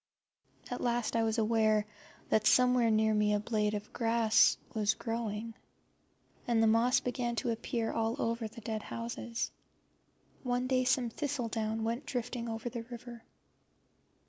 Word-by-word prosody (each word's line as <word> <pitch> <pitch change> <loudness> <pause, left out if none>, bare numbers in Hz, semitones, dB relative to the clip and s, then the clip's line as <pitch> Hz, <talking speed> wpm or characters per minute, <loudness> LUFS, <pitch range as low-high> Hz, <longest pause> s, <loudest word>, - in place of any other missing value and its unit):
At 245 - -3
last 240 -1 0
I 230 - +3
was 225 0 0
aware 215 -1 +3 0.4
that 215 0 +3
somewhere 250 -2 +5
near 220 0 +3
me 210 0 +3
a - - +1
blade 210 -1 0
of 205 0 -6
grass 230 -2 +4 0.2
was 215 0 +1
growing, 225 -1 -4 0.9
and 230 -2 +3
the - - +5
moss 230 +3 +4
began 240 -1 -2
to 235 - -1
appear 225 0 -2
all 225 +1 -1
over 230 0 -1
the 230 +2 -12
dead 220 0 -3
houses. 230 +1 -4 0.9
One 245 0 -1
day 255 0 +1
some 250 -2 +2
thistledown 225 -5 -2
went 235 +5 -2
drifting 245 -1 -3
over 225 +1 -4
the 240 -1 -4
river. 240 0 -9
230 Hz, 145 wpm, -32 LUFS, 220-240 Hz, 0.9 s, somewhere